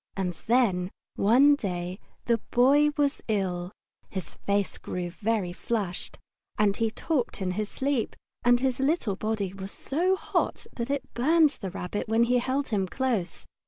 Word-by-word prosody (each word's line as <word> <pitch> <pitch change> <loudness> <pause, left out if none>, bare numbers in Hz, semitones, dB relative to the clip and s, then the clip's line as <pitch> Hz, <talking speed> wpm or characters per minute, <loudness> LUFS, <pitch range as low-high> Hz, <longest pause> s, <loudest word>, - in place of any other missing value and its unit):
And 185 -2 -1
then, 210 -7 +3 0.3
one 255 +8 +6
day, 180 -7 -3 0.3
the 235 -1 +2
Boy 280 +5 +5
was 285 0 +1
ill. 185 -4 -1 0.4
His 190 -2 -6
face 200 -1 -1
grew 175 -1 -4
very 205 -2 -1
flushed, 195 -3 -3 0.4
and 205 -1 +3
he 225 +1 +1
talked 255 +1 -1
in 185 -2 -1
his 210 +3 -2
sleep, 270 -4 -1 0.3
and 245 0 +5
his 260 0 0
little 270 - +1
body 215 -2 -2
was 195 0 -6
so 355 +7 0
hot - - -1
that 235 +1 -3
it 280 -1 -3
burned 310 +4 +4
the 200 -8 -6
Rabbit 185 +4 -4
when 225 +1 +4
he 245 +1 +3
held 265 +3 -1
him 200 -4 0
close. 235 -5 -2
225 Hz, 160 wpm, -27 LUFS, 190-265 Hz, 0.4 s, one